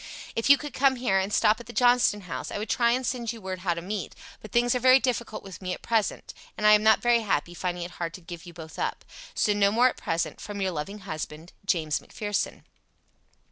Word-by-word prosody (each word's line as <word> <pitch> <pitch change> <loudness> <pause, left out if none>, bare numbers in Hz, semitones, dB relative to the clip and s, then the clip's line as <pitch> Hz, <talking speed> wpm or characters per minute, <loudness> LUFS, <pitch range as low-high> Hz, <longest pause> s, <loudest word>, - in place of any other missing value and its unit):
If 230 - 0
you 280 - +9
could 295 0 -7
come 270 0 +3
here 240 -6 +1
and 190 +2 -2
stop 210 +1 +3
at 240 - -11
the 240 - -9
Johnston 245 -4 +4
House 180 -3 -6
I - - -4
would 210 +2 -4
try 235 -1 +3
and 250 +2 +1
send 240 -3 -2
you 230 - -9
word 190 -2 -5
how 180 -2 0
to 170 - -6
meet, 195 -2 -4 0.3
but 215 - -11
things 240 0 +3
are 250 - 0
very 255 +1 +6
difficult 240 -4 -2
with 195 -2 -10
me 185 -1 -3
at - - -17
present, 225 -3 -1 0.2
and 210 - -2
I 210 - +8
am 210 0 +6
not 220 0 +4
very 240 -1 +4
happy, 175 -6 -1
finding 175 0 -3
it 175 - -7
hard 165 -1 -3
to 185 - -11
give 175 0 -9
you - - -8
both 160 -1 -10
up. - - -3 0.3
So 210 - +2
no 200 -1 +3
more 245 +4 +5
at - - -8
present, 165 0 -2
from 205 -1 -6
your 190 -1 0
loving 190 +6 -5
husband, 155 -2 -7
"James 160 -6 +1
McPherson." 205 -1 -3
205 Hz, 245 wpm, -27 LUFS, 180-235 Hz, 0.3 s, you